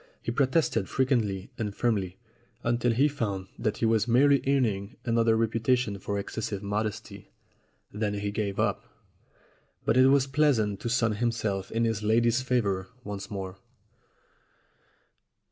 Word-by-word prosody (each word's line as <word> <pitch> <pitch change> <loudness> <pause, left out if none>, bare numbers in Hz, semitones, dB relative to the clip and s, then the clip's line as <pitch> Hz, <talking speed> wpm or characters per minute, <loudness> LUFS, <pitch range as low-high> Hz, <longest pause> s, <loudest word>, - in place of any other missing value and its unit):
He - - -3
protested 130 - +1
frequently 115 -8 0
and 105 -3 -3
firmly, 100 -6 -1 0.5
until 120 +1 +1
he 130 +6 +3
found 100 -10 -3
that 110 -1 -1
he - - 0
was 110 -1 +2
merely 140 +3 +4
earning 115 -5 0
another 115 -1 +3
reputation 115 -1 +1
for 100 +1 -3
excessive 100 0 -4
mod 105 +2 0
esty. 105 - -9 0.6
Then 105 0 -1
he 100 0 -2
gave 100 -1 -2
up. - - 0 1.0
But - - +2
it 130 0 +7
was 135 -1 +4
pleasant 135 -8 +1
to 120 - -3
sun 115 -2 +2
himself 105 -4 -1
in 115 +1 +1
his 110 -2 -1
lady's 115 +3 +2
favor 105 -8 0
once 100 -2 -6
more. 95 -2 -6
110 Hz, 140 wpm, -28 LUFS, 100-125 Hz, 1.0 s, it